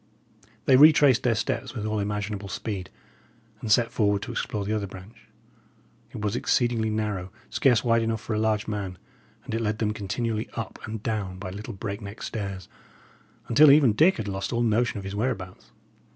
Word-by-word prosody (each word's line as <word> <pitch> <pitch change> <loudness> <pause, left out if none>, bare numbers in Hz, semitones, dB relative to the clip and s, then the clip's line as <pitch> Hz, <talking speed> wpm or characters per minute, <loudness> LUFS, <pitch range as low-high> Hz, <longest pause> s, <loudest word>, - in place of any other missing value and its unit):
They 130 - +6
retraced 145 -3 +7
their 120 -2 +2
steps 120 +3 -2
with 110 -3 -3
all 110 0 -1
imaginable 105 0 -3
speed, 100 -4 -4 0.7
and 110 -1 -4
set 115 +2 +4
forward 100 -2 +1
to - - -5
explore 105 -3 -3
the 105 - -1
other 105 -2 -1
branch. 95 +4 -13 0.8
It - - -8
was 105 +1 -1
exceedingly 120 -3 +1
narrow, 105 -4 -2 0.2
scarce 125 -5 +3
wide 115 -1 +3
enough 115 -1 -1
for 115 - -4
a 110 - 0
large 110 -1 0
man; 100 -4 -4 0.5
and - - -6
it 115 - 0
led 105 -1 -1
them 105 -1 0
continually 110 +2 -3
up 115 - -5
and 110 -1 -6
down 100 -5 -2
by 95 -1 -6
little 105 +3 -7
break 100 +1 -5
neck 100 +2 -8
stairs, 100 -4 -5 0.8
until 145 +6 +7
even 140 -5 +6
Dick 160 - +4
had 110 -3 -4
lost 95 0 -3
all 120 -1 +1
notion 115 +1 +1
of 100 - -5
his 95 0 -6
whereabouts. 100 - -3
110 Hz, 185 wpm, -26 LUFS, 100-115 Hz, 0.8 s, retraced